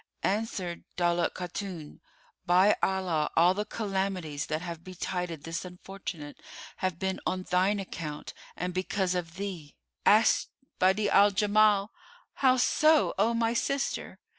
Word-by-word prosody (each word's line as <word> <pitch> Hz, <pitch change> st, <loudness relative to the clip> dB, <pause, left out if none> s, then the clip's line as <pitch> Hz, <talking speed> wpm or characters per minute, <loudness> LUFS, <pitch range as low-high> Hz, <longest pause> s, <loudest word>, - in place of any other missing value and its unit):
Answered 190 Hz, -4 st, -2 dB
Daulat 175 Hz, -1 st, +1 dB
Khatun, 180 Hz, -3 st, -6 dB, 0.5 s
"By 185 Hz, +4 st, +5 dB
Allah, 180 Hz, -5 st, 0 dB
all 175 Hz, +2 st, +6 dB
the 210 Hz, +2 st, -2 dB
calamities 190 Hz, -8 st, -3 dB
that 155 Hz, +2 st, -2 dB
have 170 Hz, -2 st, -6 dB
betided 180 Hz, -3 st, -4 dB
this 165 Hz, 0 st, -4 dB
unfortunate 180 Hz, -4 st, -8 dB, 0.4 s
have 185 Hz, -3 st, -2 dB
been 190 Hz, +1 st, -2 dB
on 185 Hz, 0 st, -1 dB
thine 190 Hz, +3 st, +1 dB
account 160 Hz, -6 st, -6 dB, 0.2 s
and 180 Hz, +1 st, -3 dB
because 185 Hz, 0 st, -1 dB
of 170 Hz, -2 st, -4 dB
thee!" 185 Hz, -7 st, -6 dB, 0.3 s
Asked 215 Hz, +2 st, +4 dB, 0.3 s
Badi'a 190 Hz, +3 st, +3 dB
al 205 Hz, +1 st, +6 dB
Jamal, 205 Hz, 0 st, +3 dB, 0.4 s
"How 260 Hz, -1 st, +3 dB
so, 310 Hz, +5 st, +4 dB
O 230 Hz, +3 st, +3 dB
my 230 Hz, 0 st, +1 dB
sister?" 275 Hz, +3 st, -2 dB
185 Hz, 130 wpm, -29 LUFS, 175-205 Hz, 0.5 s, all